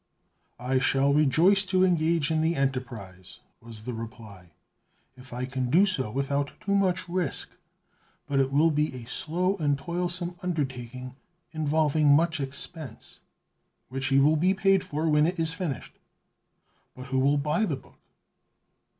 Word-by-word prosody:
'" - - -45
"I 130 - +4
shall 135 +1 +2
rejoice 160 +7 +4
to 185 0 +2
engage 165 -3 +1
in 160 -1 +1
the 165 +1 +1
enterprise," 120 - -4 0.2
was 115 -1 -12
the 125 - -4
reply, 110 -5 -9 0.7
"if 130 0 -15
I 125 +1 -3
can 130 -1 -3
do 180 +9 +5
so 175 - 0
without 140 +3 -2
too 200 - -2
much 185 -3 +1
risk, 175 -4 -2 0.7
but 140 -1 0
it 135 0 +1
will 155 +4 +4
be 150 0 0
a 120 -2 -8
slow 180 +9 -1
and 145 -4 +1
toilsome 175 +2 -3
undertaking, 130 -6 -4 0.3
involving 155 -1 +1
much 160 +3 +4
expense" 140 +2 -7 0.7
"Which 135 +1 -3
you 135 0 +5
will 155 +2 +4
be 185 +5 +2
paid 195 -1 +3
for 155 +2 -2
when 150 0 +4
it 180 +2 -2
is 160 0 0
finished." 165 -6 -5 1.0
"But 130 - -9
who 130 0 +1
will 140 +2 +3
buy 150 +9 +1
the 150 -9 -2
book?" - - -20
145 Hz, 155 wpm, -27 LUFS, 130-170 Hz, 1.0 s, do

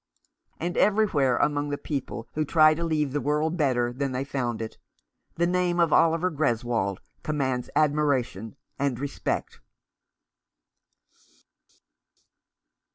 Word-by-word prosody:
And 175 +2 -3
everywhere, 180 - +3
among 145 0 +1
the. 145 - -2
people 140 -5 -5
who 155 - 0
try 155 +1 +5
to 165 +2 -4
leave 155 -4 0
the 145 - 0
world 150 +3 0
better 125 -6 +1
than 135 +1 -2
they 130 +1 -1
found 125 -5 -3
it, 110 -1 -6 0.6
the 170 - +2
name 175 0 +1
of 170 -3 +3
Oliver 165 +2 +3
Greswold 120 - 0 0.2
commands 130 -5 -2
admiration 140 -8 +1 0.2
and 135 -4 0
respect. 140 0 -3
145 Hz, 115 wpm, -26 LUFS, 125-155 Hz, 0.6 s, try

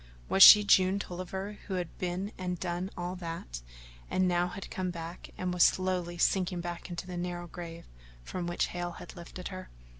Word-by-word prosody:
Was 195 - +2
she 210 +1 +12
June 190 -1 +4
Tolliver 190 +2 -5
who 195 - -2
had 175 -2 -4
been 185 +3 -2
and 180 -1 -4
done 180 +1 -2
all 175 +1 -3
that, 165 - -6 0.5
and 185 0 +2
now 175 0 +2
had 190 +2 -8
come 185 -1 -2
back 170 0 -7
and 180 -1 -2
was 180 - -1
slowly 180 -2 +2
sinking 180 0 +1
back 175 +1 -6
into 175 +1 -5
the 180 -1 -6
narrow 175 0 -4
grave 170 -1 -8 0.4
from 175 - -4
which 175 - 0
Hale 175 -1 -4
had - - -10
lifted 175 +1 -8
her? 185 -1 -8
180 Hz, 185 wpm, -30 LUFS, 175-185 Hz, 0.5 s, she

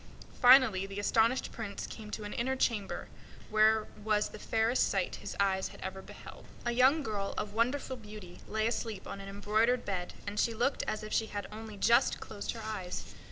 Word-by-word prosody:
Finally, 245 -7 +7
the 195 +1 -6
astonished 230 +4 +2
Prince 210 -3 -5
came 215 -2 -9
to 210 - -5
an 205 - -5
inner 260 +1 0
chamber, 225 -6 -1 0.4
where 215 0 +4 0.2
was 210 -1 +2
the 215 - -10
fairest 225 +4 +2
sight 190 -2 -1
his - - -7
eyes 190 -1 +2
ever 190 +1 -5
beheld. - - -12 0.2
A 240 - +1
young 260 +6 +4
girl 205 -4 -3
of 205 -1 -3
wonderful 255 +3 0
beauty 210 -5 -10
lay 220 0 0
asleep 225 -3 -2
on 195 - -6
an 195 - -8
embroidered 215 +5 +1
bed, 180 -3 -3
and 205 +1 -3
she 230 - +2
looked 245 +5 +1
as 215 - -2
if 215 - -6
she 220 - +2
had 205 -1 -4
only 215 -1 -8
just 235 +4 +4
closed 200 - -5
her 225 -2 -8
eyes. 210 -5 -5
215 Hz, 190 wpm, -32 LUFS, 200-235 Hz, 0.4 s, Finally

